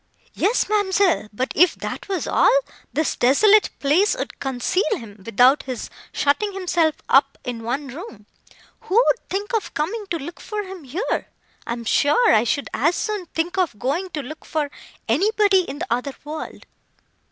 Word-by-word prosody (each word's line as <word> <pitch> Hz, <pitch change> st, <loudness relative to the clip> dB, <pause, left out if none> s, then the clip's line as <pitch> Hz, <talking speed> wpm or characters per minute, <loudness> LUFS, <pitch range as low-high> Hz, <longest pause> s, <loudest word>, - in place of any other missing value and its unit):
"Yes, 445 Hz, +5 st, +1 dB
ma'amselle, 400 Hz, -, +2 dB
but 255 Hz, +6 st, -2 dB
if 355 Hz, +4 st, +5 dB
that -, -, -6 dB
was 380 Hz, -2 st, -1 dB
all, -, -, +4 dB, 0.3 s
this 315 Hz, +1 st, 0 dB
desolate 410 Hz, -, +5 dB
place 365 Hz, -, +2 dB
would -, -, -5 dB
conceal 270 Hz, +7 st, 0 dB, 0.2 s
him, 210 Hz, -3 st, -12 dB
without 245 Hz, +7 st, +4 dB
his 255 Hz, -3 st, -6 dB, 0.2 s
shutting 400 Hz, +9 st, +1 dB
himself 345 Hz, -4 st, +1 dB
up 275 Hz, 0 st, +4 dB
in 245 Hz, -3 st, -5 dB
one 260 Hz, +5 st, -3 dB
room. 260 Hz, -, -9 dB, 0.5 s
Who 375 Hz, -, -4 dB
would 485 Hz, +1 st, +3 dB
think 405 Hz, +5 st, -3 dB
of 445 Hz, -3 st, -2 dB
coming 400 Hz, +9 st, -2 dB
to 340 Hz, -, -1 dB
look 335 Hz, +4 st, -8 dB
for 420 Hz, -1 st, -4 dB
him 375 Hz, -5 st, -9 dB
here? 335 Hz, -, -2 dB, 0.4 s
I -, -, -1 dB
am 235 Hz, -1 st, -7 dB
sure 300 Hz, -, +4 dB
I 220 Hz, +2 st, +4 dB
should 285 Hz, +4 st, -1 dB
as 320 Hz, +6 st, +2 dB
soon 420 Hz, -5 st, -3 dB
think 345 Hz, +4 st, -2 dB
of 345 Hz, -, 0 dB
going 300 Hz, -, -1 dB
to 295 Hz, -, -3 dB
look 310 Hz, +5 st, -9 dB
for 300 Hz, -3 st, -2 dB, 0.4 s
anybody 390 Hz, -, +3 dB
in 280 Hz, -, -5 dB
the 350 Hz, +5 st, -4 dB
other 255 Hz, +3 st, -3 dB
world." 305 Hz, +2 st, -7 dB
320 Hz, 170 wpm, -22 LUFS, 265-390 Hz, 0.5 s, if